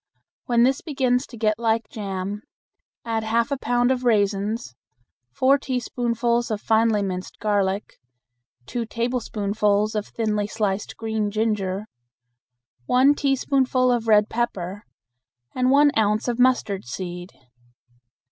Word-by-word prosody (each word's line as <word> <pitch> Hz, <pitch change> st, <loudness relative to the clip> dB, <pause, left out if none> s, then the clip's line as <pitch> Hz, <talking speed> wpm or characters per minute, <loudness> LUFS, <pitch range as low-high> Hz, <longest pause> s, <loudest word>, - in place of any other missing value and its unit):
When 235 Hz, -1 st, +4 dB
this 265 Hz, +2 st, +2 dB
begins 260 Hz, -4 st, 0 dB
to 235 Hz, -, -11 dB
get 215 Hz, 0 st, +1 dB
like 225 Hz, -1 st, 0 dB
jam, 200 Hz, -1 st, -5 dB, 0.6 s
add 225 Hz, -1 st, -1 dB
half 230 Hz, +4 st, 0 dB
a 280 Hz, -, 0 dB
pound 245 Hz, 0 st, +1 dB
of 255 Hz, -1 st, -1 dB
raisins, 205 Hz, -, 0 dB, 0.6 s
four 270 Hz, -, +3 dB
teaspoonfuls 240 Hz, -2 st, -1 dB
of 215 Hz, -2 st, -2 dB
finely 220 Hz, -1 st, +2 dB
minced 185 Hz, -1 st, -5 dB
garlic, 205 Hz, -1 st, -1 dB, 0.7 s
two 235 Hz, -, -4 dB
tablespoonfuls 215 Hz, -3 st, 0 dB
of 210 Hz, -1 st, -2 dB
thinly 210 Hz, -2 st, -1 dB
sliced 210 Hz, -2 st, -2 dB
green 220 Hz, -2 st, -2 dB
ginger, 210 Hz, -2 st, -1 dB, 1.0 s
one 260 Hz, +3 st, +5 dB
teaspoonful 265 Hz, -2 st, +1 dB
of 235 Hz, -2 st, -1 dB
red 210 Hz, -1 st, +5 dB
pepper, 205 Hz, -4 st, -3 dB, 0.7 s
and 255 Hz, 0 st, +1 dB
one 285 Hz, +2 st, +5 dB
ounce 215 Hz, +1 st, +1 dB
of 240 Hz, 0 st, -1 dB
mustard 245 Hz, -6 st, +2 dB
seed. 175 Hz, +7 st, -6 dB
225 Hz, 120 wpm, -23 LUFS, 205-245 Hz, 1.0 s, one